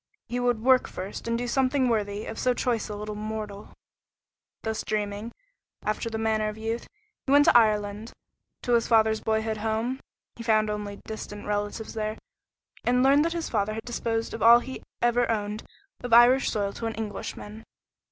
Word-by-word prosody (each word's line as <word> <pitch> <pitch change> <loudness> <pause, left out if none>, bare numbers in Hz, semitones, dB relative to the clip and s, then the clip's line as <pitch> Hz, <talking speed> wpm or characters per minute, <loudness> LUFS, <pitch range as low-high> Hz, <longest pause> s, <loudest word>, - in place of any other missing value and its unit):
He 245 - -3
would 245 -3 0
work 260 0 +5
first 190 +4 -7
and 230 0 0
do 245 +1 -3
something 260 +1 +2
worthy 210 -2 -1
of 225 - -6
so 250 -1 +2
choice 235 -4 -1
a 210 - -4
little 210 +1 -5
mortal. 210 -1 -6 0.9
Thus 220 -1 -2
dreaming, 210 +1 -3 0.5
after 215 +2 -1
the 220 - -3
manner 220 -1 +1
of 210 - -8
youth, 225 +2 -3 0.4
he - - +1
went 290 +1 +6
to - - +5
Ireland, 210 -1 +2 0.5
to 245 - +1
his 235 -1 +3
father's 220 -1 +3
boyhood 220 0 0
home. 225 +4 -1 0.4
He - - -7
found 215 -2 +2
only 205 -1 -4
distant 210 -1 -7
relatives 205 +1 -3
there, 215 0 -3 0.7
and 250 +1 +3
learned 280 +2 +5
that 335 - 0
his 335 -1 -3
father 215 -1 0
had 225 - -6
disposed 230 -1 -2
of 225 - -6
all 235 +1 +9
he 260 +2 -6 0.2
ever 240 0 +3
owned 210 -1 -1 0.4
of 245 -2 -2
Irish 245 +3 +7
soil 200 -2 -1
to 230 - -4
an 225 - -4
Englishman. 215 0 -6
220 Hz, 180 wpm, -27 LUFS, 215-240 Hz, 0.9 s, all